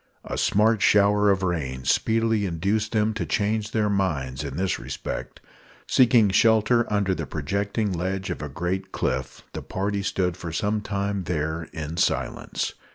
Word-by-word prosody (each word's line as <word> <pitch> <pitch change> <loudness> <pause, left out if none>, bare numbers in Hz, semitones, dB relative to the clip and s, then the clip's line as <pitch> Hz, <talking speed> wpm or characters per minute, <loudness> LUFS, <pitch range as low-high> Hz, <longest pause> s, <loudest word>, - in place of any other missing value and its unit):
A - - -4
smart 110 +1 +2
shower 105 0 +4
of 95 -1 +2
rain 70 -8 -2
speedily 110 -2 +2
induced 100 +6 -1
them 110 0 +1
to 110 - -3
change 105 0 0
their 110 -1 +1
minds 75 -10 -1
in 70 -1 -5
this 95 0 0
respect. - - -6 0.5
Seeking 120 -5 +5
shelter 110 +3 +3
under 100 -2 +1
the - - -4
projecting 100 +7 -2
ledge 95 +2 -2
of - - -5
a - - -4
great 95 +2 -3
cliff, 65 0 -3
the - - -5
party 100 +1 -2
stood 90 -3 -1
for 85 -2 -6
some 105 +6 -1
time 100 -2 -2
there 80 -1 -2
in 80 +1 -5
silence. - - -1
100 Hz, 160 wpm, -25 LUFS, 85-105 Hz, 0.5 s, Seeking